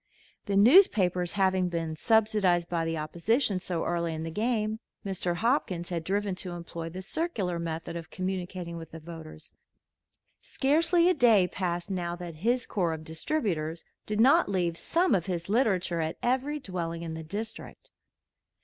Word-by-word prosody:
The 200 Hz, -, 0 dB
newspapers 200 Hz, -, +5 dB
having 190 Hz, -2 st, +2 dB
been 165 Hz, -2 st, -3 dB
subsidized 210 Hz, -3 st, +2 dB
by 170 Hz, -2 st, -1 dB
the 165 Hz, 0 st, -2 dB
opposition 185 Hz, -, +1 dB
so 175 Hz, -2 st, -3 dB
early 170 Hz, -1 st, -1 dB
in 160 Hz, -, -4 dB
the 165 Hz, -, -4 dB
game, 220 Hz, +1 st, -1 dB, 0.3 s
Mr. 185 Hz, -3 st, -1 dB
Hopkins 185 Hz, -, 0 dB
had 170 Hz, -2 st, -3 dB
driven 200 Hz, +2 st, -1 dB
to 180 Hz, -2 st, -5 dB
employ 170 Hz, -1 st, -6 dB
the 185 Hz, +3 st, -7 dB
circular 205 Hz, -, -2 dB
method 165 Hz, 0 st, -4 dB
of 165 Hz, -1 st, -6 dB
communicating 185 Hz, -2 st, -4 dB
with 165 Hz, -1 st, -8 dB
the 165 Hz, -, -9 dB
voters. 160 Hz, -1 st, -10 dB, 0.9 s
Scarcely 335 Hz, +5 st, +3 dB
a 365 Hz, -, +5 dB
day 225 Hz, -, +5 dB
passed 175 Hz, 0 st, -3 dB
now 175 Hz, -2 st, -2 dB
that 175 Hz, -2 st, -8 dB
his 240 Hz, +8 st, +1 dB
corps 175 Hz, -5 st, 0 dB
of 160 Hz, 0 st, -6 dB
distributors 160 Hz, -, -2 dB, 0.2 s
did 210 Hz, 0 st, -2 dB
not 280 Hz, +7 st, +5 dB
leave 175 Hz, -4 st, 0 dB
some 340 Hz, -, +2 dB
of 180 Hz, -3 st, +1 dB
his 175 Hz, -1 st, -3 dB
literature 190 Hz, -7 st, +1 dB
at 160 Hz, 0 st, -3 dB
every 265 Hz, +4 st, 0 dB
dwelling 170 Hz, -7 st, -4 dB
in 165 Hz, -1 st, -5 dB
the 160 Hz, -, -5 dB
district. 205 Hz, +8 st, -7 dB
180 Hz, 160 wpm, -28 LUFS, 170-215 Hz, 0.9 s, newspapers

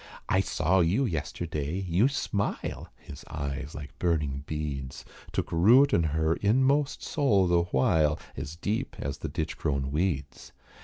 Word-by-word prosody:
"I 95 Hz, -, +3 dB
saw 95 Hz, -1 st, +1 dB
you 90 Hz, +11 st, +2 dB
yesterday. 80 Hz, -, -3 dB
You 90 Hz, +8 st, +3 dB
smile." 105 Hz, -7 st, -2 dB
His 70 Hz, -, -11 dB
eyes, 70 Hz, 0 st, -4 dB
like 75 Hz, -1 st, -9 dB
burning 75 Hz, -5 st, 0 dB
beads, 70 Hz, -4 st, -4 dB, 0.3 s
Took -, -, -2 dB
root 120 Hz, +12 st, +5 dB
in -, -, +4 dB
her 80 Hz, +1 st, +1 dB
inmost 135 Hz, +7 st, +2 dB
soul 110 Hz, -11 st, +2 dB
the 85 Hz, -1 st, +3 dB
while, 75 Hz, +1 st, +2 dB, 0.2 s
As 75 Hz, +3 st, -6 dB
deep 105 Hz, +6 st, -2 dB
as 70 Hz, -, -4 dB
the -, -, -4 dB
ditch -, -, -4 dB
grown 70 Hz, -2 st, -1 dB
weeds. 75 Hz, -4 st, -2 dB
80 Hz, 145 wpm, -28 LUFS, 70-100 Hz, 0.3 s, root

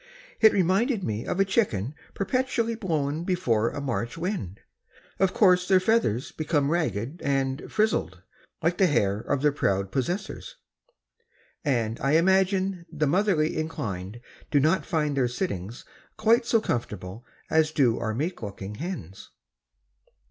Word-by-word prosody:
It 220 Hz, -1 st, +7 dB
reminded 195 Hz, +5 st, +1 dB
me 110 Hz, -3 st, -3 dB
of 180 Hz, -, -2 dB
a 195 Hz, -, +5 dB
chicken 145 Hz, -, 0 dB, 0.2 s
perpetually 230 Hz, +2 st, 0 dB
blown 160 Hz, -7 st, -2 dB
before 120 Hz, -, +1 dB
a -, -, -6 dB
March 120 Hz, -3 st, -3 dB
wind. 165 Hz, -, -4 dB, 0.6 s
Of 190 Hz, -1 st, +3 dB
course, 180 Hz, -3 st, +4 dB
their 190 Hz, -1 st, +5 dB
feathers 185 Hz, -, +1 dB
become 150 Hz, -2 st, 0 dB
ragged 140 Hz, -, -2 dB
and 135 Hz, 0 st, -1 dB
"frizzled," 210 Hz, -, 0 dB, 0.4 s
like 170 Hz, +2 st, +1 dB
the 190 Hz, -, +5 dB
hair 105 Hz, -, +1 dB
of 130 Hz, +4 st, -2 dB
their 150 Hz, -, +5 dB
proud 100 Hz, -8 st, 0 dB
possessors, 185 Hz, -, -3 dB, 1.1 s
and 115 Hz, -6 st, 0 dB
I 135 Hz, +2 st, +1 dB
imagine 190 Hz, +1 st, +2 dB
the 155 Hz, -2 st, 0 dB
motherly 175 Hz, -1 st, +2 dB
inclined 105 Hz, -, -4 dB, 0.3 s
do 145 Hz, -, +3 dB
not 160 Hz, +7 st, +2 dB
find 150 Hz, -4 st, 0 dB
their 130 Hz, -3 st, +2 dB
sittings 120 Hz, -, -4 dB, 0.3 s
quite 230 Hz, +2 st, +3 dB
so 230 Hz, -, +4 dB
comfortable 105 Hz, -, -4 dB, 0.3 s
as 160 Hz, -1 st, +4 dB
do 130 Hz, -7 st, +2 dB
our 110 Hz, -2 st, -2 dB
meek 160 Hz, +6 st, -3 dB
looking 100 Hz, -1 st, -6 dB
hens. 110 Hz, -, -6 dB
155 Hz, 140 wpm, -26 LUFS, 115-190 Hz, 1.1 s, It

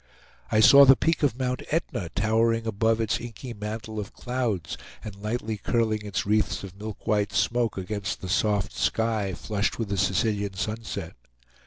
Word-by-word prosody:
I 110 Hz, -, +4 dB
saw 140 Hz, +7 st, +9 dB
the 135 Hz, 0 st, +8 dB
peak 165 Hz, +3 st, 0 dB
of 140 Hz, -5 st, +1 dB
Mount 125 Hz, -1 st, -1 dB
Etna 125 Hz, -, -2 dB
towering 115 Hz, +2 st, +2 dB
above 110 Hz, +1 st, +1 dB
its 110 Hz, -2 st, 0 dB
inky 120 Hz, +1 st, -7 dB
mantle 110 Hz, +1 st, -5 dB
of 100 Hz, -1 st, -6 dB
clouds 120 Hz, -10 st, -2 dB, 0.3 s
and 105 Hz, -2 st, -7 dB
lightly 110 Hz, +2 st, -3 dB
curling 110 Hz, 0 st, 0 dB
its 105 Hz, +2 st, -2 dB
wreaths 105 Hz, 0 st, +1 dB
of 95 Hz, -1 st, -9 dB
milk 105 Hz, -1 st, -7 dB
white 105 Hz, -1 st, +1 dB
smoke 120 Hz, -4 st, +1 dB
against 100 Hz, +1 st, -3 dB
the 95 Hz, -, -5 dB
soft 100 Hz, +1 st, +1 dB
sky 110 Hz, -4 st, 0 dB
flushed 105 Hz, -1 st, -2 dB
with 115 Hz, -3 st, -3 dB
the 100 Hz, -, -1 dB
Sicilian 100 Hz, +2 st, 0 dB
sunset. 100 Hz, -3 st, -4 dB
110 Hz, 165 wpm, -26 LUFS, 100-115 Hz, 0.3 s, saw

